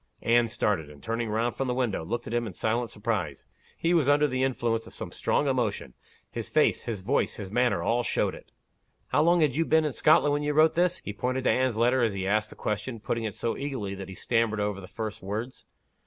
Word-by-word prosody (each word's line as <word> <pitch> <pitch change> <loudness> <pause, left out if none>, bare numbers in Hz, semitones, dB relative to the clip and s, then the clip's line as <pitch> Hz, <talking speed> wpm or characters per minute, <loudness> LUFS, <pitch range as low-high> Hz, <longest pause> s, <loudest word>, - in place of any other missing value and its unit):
Anne 120 0 +4
started; 105 -9 -1
and 75 -1 -15
turning 115 0 -2
round 115 +3 0
from 135 - -2
the 125 - -1
window, 120 -9 -1
looked 120 +8 -3
at - - -6
him 120 -1 0
in 100 - -7
silent 115 +6 -1
surprise. 105 -11 -3 0.3
He 170 +1 +1
was 160 -6 +3
under 145 +1 +4
the 130 -1 -2
influence 120 -4 0
of - - -8
strong 145 - +1
emotion; 115 - -1 0.4
his - - -4
face, - - +3
his 105 -5 -4
voice, 135 +8 +1
his 100 -3 -7
manner, 120 -6 +2
all 115 +6 +2
showed - - 0
it. - - -13 0.6
"How - - +3
long 170 +2 +4
had 145 -5 +2
you 165 - +2
been 160 0 +3
in 150 - -1
Scotland, 150 -1 +4
when 145 - 0
you 150 0 0
wrote 155 +1 +5
this?" 180 +1 +1
He 105 - -4
pointed 125 +4 -2
to - - +3
Anne's 130 -3 +1
letter 125 +3 +3
as 115 -3 +2
he 95 -1 -3
asked 105 +2 +1
the - - -11
question, 105 +3 -3
put - - -2
ting 115 -1 -3
it 105 - -4
so 115 - -2
eagerly 130 -9 -4
that 95 -1 -7
he 95 - -8
stammered 115 -1 0
over 105 -1 -2
the 95 - -10
first 110 0 -5
words. 110 +6 -5
115 Hz, 240 wpm, -27 LUFS, 105-130 Hz, 0.6 s, wrote